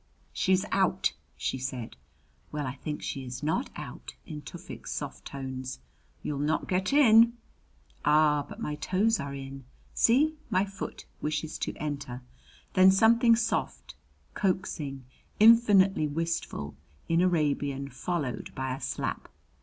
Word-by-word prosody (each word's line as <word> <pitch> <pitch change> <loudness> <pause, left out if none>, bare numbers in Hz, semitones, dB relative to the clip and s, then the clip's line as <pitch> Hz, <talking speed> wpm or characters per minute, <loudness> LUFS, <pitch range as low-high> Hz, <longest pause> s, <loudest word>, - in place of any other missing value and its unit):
"She's 190 +1 +2
out," 190 -1 +2 0.2
she 130 - -2
said. 125 -2 -5 0.6
"Well, 150 -1 -3
I 130 - -3
think 150 +3 -6
she 135 - -4
is 125 +2 -7
not 160 - 0
out," - - -8
in 150 -3 -7
Tufik's 175 +3 -9
soft 145 -2 -5
tones. 130 -2 -5 0.5
"You'll 145 -2 -3
not 150 +2 0
get 185 +3 0
in." 235 -5 +7 0.7
"Ah, 150 -1 +4
but - - -9
my 150 - -3
toes 190 +9 +1
are 140 0 -4
in. 135 0 -8 0.3
See, 285 +7 +4 0.2
my 185 +2 +2
foot 195 0 -7 0.2
wishes 155 +1 -2
to - - -3
enter!" 140 -4 -5 0.5
Then 185 0 +7
something 230 +4 +5
soft, 70 - -2 0.4
coaxing, 155 -9 -2 0.3
infinitely 205 -6 +6
wistful, 155 - -3 0.3
in 165 +1 +3
Arabian 145 -5 +1
followed 140 0 -3
by 130 -1 -2
a - - -11
slap. - - -3
155 Hz, 130 wpm, -29 LUFS, 135-190 Hz, 0.7 s, in